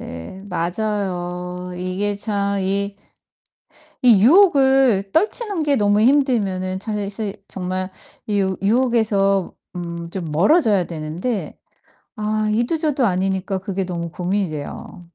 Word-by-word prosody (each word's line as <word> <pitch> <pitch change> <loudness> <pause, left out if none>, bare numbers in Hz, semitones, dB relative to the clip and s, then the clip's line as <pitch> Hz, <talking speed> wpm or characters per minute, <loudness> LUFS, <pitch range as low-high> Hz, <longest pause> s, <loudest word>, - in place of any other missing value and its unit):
네 85 - -8
맞아요. 180 -1 -3
이게 185 +3 -2
참 200 -1 -1
이 200 +1 -1 1.1
이 225 -6 +7
유혹을 270 - +5
떨치는 405 0 +2
게 290 -2 +2
너무 205 0 +3
힘들면은 220 -9 +2
차 215 +2 -4
사실 205 0 -2
정말 185 0 -3 0.4
이 205 -1 +1
유 190 -2 0
유혹에서 205 -4 +2 0.2
음 170 -1 -5
좀 185 0 -4
멀어져야 205 - +3
되는데 170 +8 -4 0.6
아 215 0 -1
이도 240 +9 +1
저도 295 -5 +1
아니니까 190 0 -1
그게 190 0 -3
너무 170 -2 -4
고민이 185 +2 -1
돼요. 150 +3 -7
200 Hz, 240 characters per minute, -20 LUFS, 185-225 Hz, 1.1 s, 이